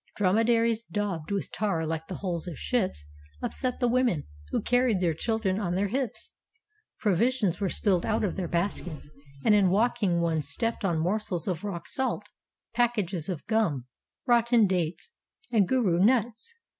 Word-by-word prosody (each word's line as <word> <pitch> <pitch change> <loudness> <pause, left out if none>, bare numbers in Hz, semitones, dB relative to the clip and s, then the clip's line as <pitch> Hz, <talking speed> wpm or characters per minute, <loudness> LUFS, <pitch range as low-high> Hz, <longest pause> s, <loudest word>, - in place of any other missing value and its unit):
Drome 195 0 +2
daries, 230 -1 +3
daubed 200 -7 -2
with 200 -1 -2
tar 190 -5 -1
like 160 0 -3
the 185 - -5
hulls 175 -3 -3
of 165 -5 -6
ships, 190 - -1 0.3
upset 255 - -1
the 245 - +2
women 240 - +2 0.3
who - - 0
carried 245 -3 +2
their 175 -3 +1
children 205 +2 -1
on 180 -4 -1
their 200 +1 0
hips. 255 0 -3 0.7
Provi 210 +2 +3
sions 210 -9 -1
were 195 - +1
spilled 185 -3 +1
out 220 0 0
of 200 - -1
their 185 -3 -2
baskets; 170 -4 -3 0.3
and 220 - +6
in 200 -3 +5
walking 205 -3 +2
one 165 -2 +1
stepped 225 - -1
on 175 -4 +1
morsels 180 0 -1
of 180 -2 -2
rock 175 -5 -5
salt, 250 -5 -1 0.5
packages 210 -8 0
of 175 -5 -4
gum, 200 - +1 0.4
rotten 235 -2 +4
dates, 180 - -1 0.4
and 210 -5 +3
gourou 195 -9 +3
mits. 235 - +1
200 Hz, 165 wpm, -28 LUFS, 175-230 Hz, 0.7 s, and